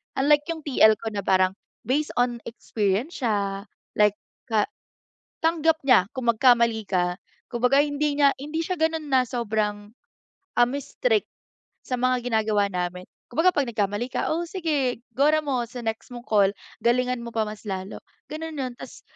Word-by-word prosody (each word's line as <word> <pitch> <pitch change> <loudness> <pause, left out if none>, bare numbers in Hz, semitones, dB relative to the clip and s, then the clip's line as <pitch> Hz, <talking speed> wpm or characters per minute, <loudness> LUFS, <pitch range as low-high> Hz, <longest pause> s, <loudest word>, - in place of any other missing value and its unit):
Unlike 290 +2 +4
yung 320 - -10
TL 250 -6 +5
ko 225 - -8
na 205 - -3
parang 185 0 +3 0.3
based 295 +4 -1
on 245 -1 +1
experience 225 - -2
siya, 200 -3 -1 0.3
like 210 -1 +4 0.3
ka 220 -3 +2 0.8
tanggap 325 -1 +3
niya 240 -9 +5
kung 240 -2 +2
magkamali 235 -2 +3
ka. 180 -1 0 0.4
Kumbaga 250 +4 +4
hindi 295 0 -1
niya 285 -1 +5
hindi 300 +4 -3
siya 365 +1 -3
gano'n 320 -1 +1
na 255 -1 +4
sobrang, 210 -4 -2 0.7
um, 240 0 +4
strict 450 - 0 0.6
sa 250 - -3
mga 255 0 +1
ginagawa 215 -2 +2
namin. 180 -1 -3 0.3
Kumbaga 325 +9 +3
'pag 285 -3 +1
nagkamali 210 +1 -1
ka, - - -2
"oh, 340 +2 -2
sige 300 -9 -1
gora 300 +5 +3
mo 265 -5 -1
sa 245 +1 -8
next 225 0 -3
mong 240 0 -9
call, 200 -3 +4 0.4
galingan 250 +1 +2
mo 235 - -5
pa 220 -1 +1
mas 210 0 -8
lalo." 190 -1 -5 0.3
Gano'n 315 +1 -6
'yun, 255 -3 -3
ta's - - -11
245 Hz, 160 wpm, -25 LUFS, 210-290 Hz, 0.8 s, TL